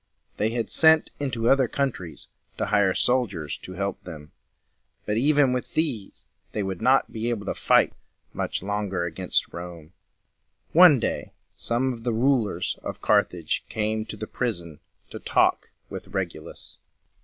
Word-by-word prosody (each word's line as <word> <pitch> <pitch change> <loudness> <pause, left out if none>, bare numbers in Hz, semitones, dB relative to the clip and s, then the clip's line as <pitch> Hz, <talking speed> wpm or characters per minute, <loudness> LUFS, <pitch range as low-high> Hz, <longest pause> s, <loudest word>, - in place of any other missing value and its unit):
They 110 - +1
had 115 -1 -3
sent 160 -1 +5
into 125 -5 -1
other 135 -1 +4
countries 110 - -3 0.3
to - - 0
hire 100 -2 +2
soldiers 100 - 0
to 95 - -9
help 100 +2 -3
them; 75 -4 -10 0.7
but 105 - -1
even 140 +1 +3
with 125 - -4
these 135 -11 -2 0.3
they 105 - -1
would 95 0 -4
not 130 +3 +3
be 115 +1 -2
able 110 -4 -3
to - - -1
fight - - +3 0.4
much - - -3
longer 100 -3 -2
against 90 +2 -2
Rome. 85 -1 -9 0.8
One 170 -5 +8
day - - -3 0.2
some 125 +2 -1
of 115 -1 -10
the 120 -1 0
rulers 120 -2 +1
of - - -6
Carthage 85 -3 +1
came 110 0 -1
to 110 -1 -8
the 110 - -5
prison 85 - -4 0.3
to - - -7
talk - - +2 0.2
with - - -8
Regulus. 90 -5 -6
110 Hz, 150 wpm, -25 LUFS, 95-125 Hz, 0.8 s, One